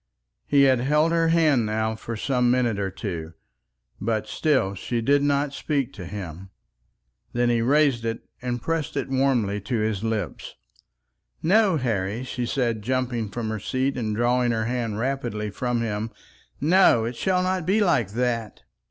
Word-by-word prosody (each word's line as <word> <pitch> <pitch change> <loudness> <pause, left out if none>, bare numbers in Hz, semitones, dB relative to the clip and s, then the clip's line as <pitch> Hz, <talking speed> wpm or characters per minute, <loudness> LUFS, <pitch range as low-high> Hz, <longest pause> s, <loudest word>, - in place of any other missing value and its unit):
He 140 -1 +5
had 130 -2 +4
held 150 +5 +2
her 165 -1 +2
hand 160 -7 +3
now 110 +1 0
for 115 +1 -6
some 125 +1 +1
minute 120 -4 +1
or 100 -1 -1
two, 85 -5 -5 0.7
but 110 +1 -1
still 130 -11 +1
she 115 +5 -3
did 140 +5 +3
not 140 0 +1
speak 140 -4 -2
to 90 -3 -8
him. 95 -2 -7 0.8
Then 120 0 +2
he 115 -1 +2
raised 135 -1 +3
it 115 0 -4
and 120 -1 -2
pressed 165 -3 -2
it 135 - -2
warmly 125 -7 +1
to 115 +5 -2
his 110 -2 -1
lips. 110 -2 -3 0.9
"No, 195 0 +4
Harry," 115 -3 -1
she 125 -1 -3
said, 115 -5 0
jumping 120 -2 -1
from 110 +2 -4
her 110 0 -3
seat 130 +6 -1
and 110 -4 -2
drawing 120 +1 +2
her 110 -1 0
hand 115 -3 -2
rapidly 120 -4 -2
from 120 +2 -1
him; 110 -1 -2 0.5
"no; 155 -8 +5
it 120 +2 -4
shall 185 +6 +1
not 185 -2 -1
be 200 +4 +3
like 145 - +2
that. 115 -2 -2
120 Hz, 165 wpm, -24 LUFS, 110-140 Hz, 0.9 s, He